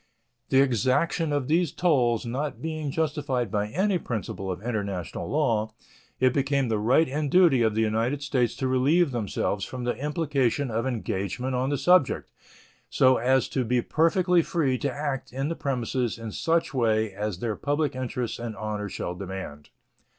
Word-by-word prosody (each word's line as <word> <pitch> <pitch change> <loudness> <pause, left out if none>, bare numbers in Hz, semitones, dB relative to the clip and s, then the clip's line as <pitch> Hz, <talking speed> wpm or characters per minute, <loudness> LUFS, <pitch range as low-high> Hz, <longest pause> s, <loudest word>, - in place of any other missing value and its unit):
The 135 0 +5
exaction 140 - +1
of 145 -3 -1
those 165 +1 +2
tolls 125 -10 +2
not 135 +4 -3
being 155 -2 -3
justified 140 - -1
by 105 0 0
any 185 - +1
principle 100 -6 -4
of 90 - -4
international 100 -7 -3
law, 110 -7 0 0.4
it 130 -1 +3
became 140 -2 +1
the 110 -2 0
right 130 +9 +3
and 145 +2 -2
duty 170 -7 +5
of 110 -2 +2
the 110 - +2
United 115 +6 0
States 130 -4 0
to 130 - -2
relieve 140 +6 +3
themselves 105 -3 -2
from 125 -1 -5
the 120 - -1
implication 140 -3 0
of 115 +3 -1
engagement 115 +1 -3
on 130 +1 0
the 145 - 0
subject, 175 +2 +3 0.6
so 130 -1 +4
as 130 +2 +2
to 130 - 0
be 125 +1 +1
perfectly 175 +2 +3
free 140 -7 0
to 140 - -1
act 135 -1 -4
in 135 +3 -2
the 165 - -2
premises 125 -3 -2
in 115 -1 -6
such 165 +6 0
way 110 -4 +1
as 105 -1 -3
their 110 +2 -2
public 145 +2 -1
interests 125 -2 -3
and 115 -2 -5
honor 105 -1 -4
shall 90 - -4
demand. 90 -6 -7
130 Hz, 170 wpm, -26 LUFS, 110-145 Hz, 0.6 s, The